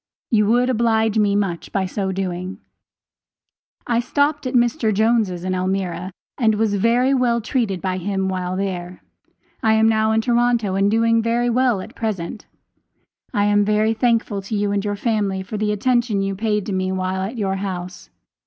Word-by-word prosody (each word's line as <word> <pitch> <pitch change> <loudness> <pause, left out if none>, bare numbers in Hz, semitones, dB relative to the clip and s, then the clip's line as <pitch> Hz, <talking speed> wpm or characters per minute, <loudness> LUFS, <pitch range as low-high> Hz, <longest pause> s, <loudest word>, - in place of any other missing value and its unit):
You 210 -3 +3
would 245 +3 +3
oblige 225 -3 +2
me 205 -1 +2
much 195 -5 -2
by 195 -2 0
so 190 +1 -2
doing. 185 0 -4 1.3
I 235 -1 +1
stopped 285 +3 0
at 255 - -3
Mr. 240 -1 +2
Jones' 215 -4 +1
in 185 0 -1
Elmira, 185 0 -2 0.3
and 220 -3 +3
was 215 -1 +1
very 235 +6 +2
well 245 -3 +2
treated 225 - -2
by 185 -1 -1
him 190 +1 -1
while 185 -1 -2
there. 180 -2 -4 0.6
I 220 -1 +3
am 220 0 +4
now 220 0 +2
in 220 - +2
Toronto 235 -3 +1
and 195 +1 +2
doing 230 +1 +3
very 235 +2 +1
well 245 -4 +2
at - - -10
present. 210 -3 -4 0.8
I 205 0 +1
am 205 0 +3
very 215 +2 +2
thankful 225 -3 0
to 195 +3 -5
you 205 0 0
and 200 -1 0
your 205 -1 -2
family 205 -3 -1
for 205 +3 -6
the 210 0 0
attention 230 -1 +1
you 195 0 -1
paid 210 0 -1
to 200 - -3
me 185 0 -1
while 190 0 -2
at 210 +6 -4
your 195 -3 -1
house. 185 -2 -6
210 Hz, 180 wpm, -21 LUFS, 190-230 Hz, 1.3 s, am